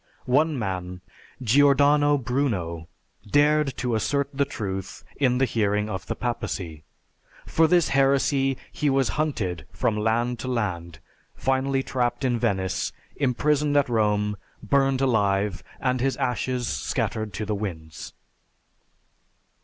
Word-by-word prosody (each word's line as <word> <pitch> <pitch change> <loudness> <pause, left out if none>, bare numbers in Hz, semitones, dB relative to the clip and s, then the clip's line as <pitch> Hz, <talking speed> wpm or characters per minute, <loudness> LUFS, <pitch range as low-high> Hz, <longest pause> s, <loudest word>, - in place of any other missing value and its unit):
One 150 +4 +2
man, 90 -4 -4 0.4
Giordano 145 +3 +4
Bruno 110 - -2 0.4
dared 145 0 +3
to 125 -2 -1
assert 140 +5 0
the 140 +1 +1
truth 95 -8 -5
in 125 -3 +2
the 135 - +3
hearing 105 -2 0
of 95 - -5
the - - -2
Papacy. 90 -10 -4 0.6
For 160 0 +3
this 175 -1 +3
heresy 135 0 +2
he 150 - 0
was 135 -1 +2
hunted 100 - -2
from 110 - 0
land 115 +3 0
to 130 - -5
land, 90 -9 -2 0.4
finally 135 0 0
trapped 125 0 -1
in 120 -2 +1
Venice, 95 -5 -1 0.3
imprisoned 145 +2 +1
at 140 - +2
Rome, 105 -2 +1 0.3
burned 135 +3 +2
alive, 100 -6 +1 0.2
and 130 -1 0
his 135 +1 0
ashes 125 0 -1
scattered 110 -1 -2
to 105 - -3
the 105 - -2
winds! 85 -7 -6
125 Hz, 125 wpm, -25 LUFS, 105-135 Hz, 0.6 s, Giordano